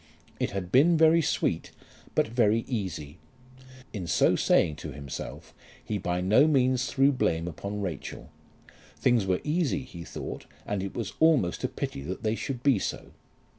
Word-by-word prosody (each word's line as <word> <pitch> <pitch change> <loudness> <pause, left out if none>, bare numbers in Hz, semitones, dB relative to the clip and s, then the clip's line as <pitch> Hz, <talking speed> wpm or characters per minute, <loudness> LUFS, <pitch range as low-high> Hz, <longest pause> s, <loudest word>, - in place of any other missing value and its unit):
It - - 0
had 90 -2 -5
been 160 +8 +5
very 160 +1 +5
sweet, - - -1 0.5
but - - +3
very 115 -1 +2
easy. 90 - -4 0.7
In 95 -6 -4
so - - +3
saying 80 -4 +2
to - - -7
himself 70 -2 -8 0.3
he 105 - -2
by 90 0 -1
no 105 +11 +5
means 130 -3 +2
threw 135 +1 +3
blame 85 -10 0
upon 100 +5 -5
Rachel. 85 -7 -6 0.7
Things 120 -6 +2
were 95 -1 +1
easy, 150 -3 0
he 85 -9 -9
thought, - - -7 0.2
and 105 -2 -2
it 95 - -5
was 110 -5 -4
almost 155 - +3
a - - +2
pity - - -5
that 90 - -6
they 110 0 +1
should 125 +2 -4
be 135 -7 +4
so. - - -4
105 Hz, 165 wpm, -28 LUFS, 90-135 Hz, 0.7 s, been